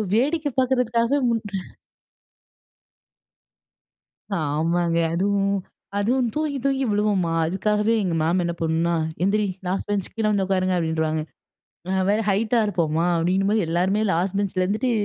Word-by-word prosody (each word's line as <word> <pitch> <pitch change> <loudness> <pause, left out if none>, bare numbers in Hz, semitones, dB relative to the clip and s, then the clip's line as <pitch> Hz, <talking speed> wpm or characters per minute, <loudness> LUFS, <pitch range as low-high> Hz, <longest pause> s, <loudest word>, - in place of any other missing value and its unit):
வேடிக்கை 295 +6 +1
பார்க்கறதுக்காகவே 250 0 +2
முன் 230 -1 0 3.0
ஆமாங்க. 165 +3 0 0.2
அதுவும் 200 +2 +1 0.4
அதுவும் 240 +4 +1
தூங்கி 305 -2 -1
தூங்கி 270 -1 +1
விழுவோமா, 205 -5 +1
அதுக்காகவே 210 +5 +1
எங்க 180 -3 -1
மேம் 170 +4 +2
என்ன 170 0 -1
பண்ணும்னா, 165 +1 +1 0.3
"எந்திரி! 210 +2 +2 0.2
லாஸ்ட் 185 +2 -2
பெஞ்ச் 200 -2 -1
கீழ 225 -1 -1
வந்து 200 -2 +1
உட்காருங்க." 185 -1 +1
அப்படின்றுவாங்க. 160 -2 0 0.7
நான் 190 0 0
வேற 210 +2 +2
ஹைட்டா 215 +4 +2
இருப்போமா, 170 -4 0
அப்படிங்கும்போது 195 +5 +1
எல்லாருமே 185 +5 +1
லாஸ்ட் 180 +4 0
பெஞ்ச்ல 190 -2 0
இருந்துட்டு 215 +7 0
195 Hz, 120 wpm, -23 LUFS, 170-220 Hz, 3.0 s, பார்க்கறதுக்காகவே